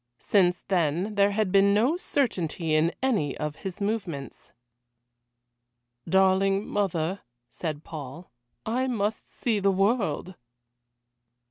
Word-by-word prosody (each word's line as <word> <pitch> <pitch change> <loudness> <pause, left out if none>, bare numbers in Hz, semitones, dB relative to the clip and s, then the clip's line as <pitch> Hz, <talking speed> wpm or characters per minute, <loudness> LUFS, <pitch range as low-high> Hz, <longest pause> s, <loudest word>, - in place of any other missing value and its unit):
Since 180 - +2
then 180 +2 0
there 200 -1 +4
had 205 -2 0
been 200 +1 +5
no 245 +10 +3
certainty 180 - -1
in 155 +2 +3
any 205 - +1
of 150 -1 -4
his 190 0 -6
movements. 200 - -4 1.6
"Darling 195 +1 +3
mother," 190 -2 -1 0.3
said 155 -3 -5
Paul, 155 +2 -9 0.3
"I 250 +4 0
must 215 -3 -2
see 225 -4 -1
the 200 0 +2
world." 195 - 0
195 Hz, 110 wpm, -26 LUFS, 165-210 Hz, 1.6 s, been